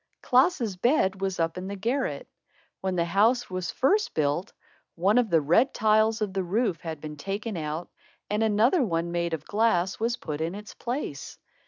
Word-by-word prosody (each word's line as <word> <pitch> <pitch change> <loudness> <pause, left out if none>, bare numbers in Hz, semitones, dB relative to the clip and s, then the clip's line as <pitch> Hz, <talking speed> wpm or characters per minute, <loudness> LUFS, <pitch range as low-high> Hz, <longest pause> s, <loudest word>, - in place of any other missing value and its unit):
Klaas's 250 - +2
bed 195 -4 +2
was 190 -2 -2
up 165 +2 0
in 185 - -6
the 200 - -4
garret. 255 - -2 0.5
When 190 -1 -2
the 170 -1 +1
house 215 +7 +2
was 185 -1 -3
first 410 +11 +1
built, 155 +6 0 0.4
one 195 +7 +3
of 235 -3 +1
the 165 -3 +4
red 175 - +3
tiles 215 +1 +3
of 200 -3 -3
the 190 - 0
roof 190 -1 0
had 160 -2 -5
been 150 0 -8
taken 200 +7 -4
out 155 +1 -4 0.4
and 210 +1 -1
another 225 - +3
one, 170 -5 -1
made 170 -1 -1
of 150 - -11
glass, 205 -4 +1
was 235 +2 0
put 150 -8 -5
in 165 +4 -2
its 210 0 -9
place. 240 - -5
195 Hz, 185 wpm, -27 LUFS, 170-230 Hz, 0.5 s, the